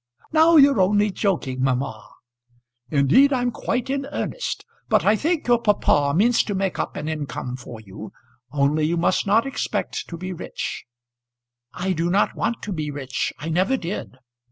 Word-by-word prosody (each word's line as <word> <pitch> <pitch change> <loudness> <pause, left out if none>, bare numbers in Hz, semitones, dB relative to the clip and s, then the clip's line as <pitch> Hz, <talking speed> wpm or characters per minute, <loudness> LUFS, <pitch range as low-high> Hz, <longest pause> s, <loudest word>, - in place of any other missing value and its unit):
"Now 320 +1 +5
you're 280 -8 +6
only 205 +2 +3
joking, 165 -11 -1
mamma." 130 -4 -1 0.8
"Indeed 150 - +4
I'm 245 -2 +1
quite 245 +1 -2
in 275 0 -2
earnest. - - -4 0.2
But - - +3
I 210 - +5
think 315 - -1
your 240 -1 +3
papa 145 -9 +2
means 230 +6 +4
to 205 - -3
make 190 -1 -1
up - - -3
an 150 - -5
income 145 -5 -4
for 125 -3 -10
you, 105 0 -10 0.4
only 145 +2 +1
you 170 +2 0
must 175 +4 +1
not 220 +5 +3
expect 270 - -3
to 170 - -6
be 185 +2 -5
rich." 170 - -5 0.9
"I 185 +1 -2
do 170 0 -1
not 195 +3 +2
want 235 - -2
to 205 - -3
be 155 -3 -3
rich. 135 -3 -3
I 155 +4 -6
never 185 +11 +1
did." 170 - -6
185 Hz, 170 wpm, -23 LUFS, 145-235 Hz, 0.9 s, you're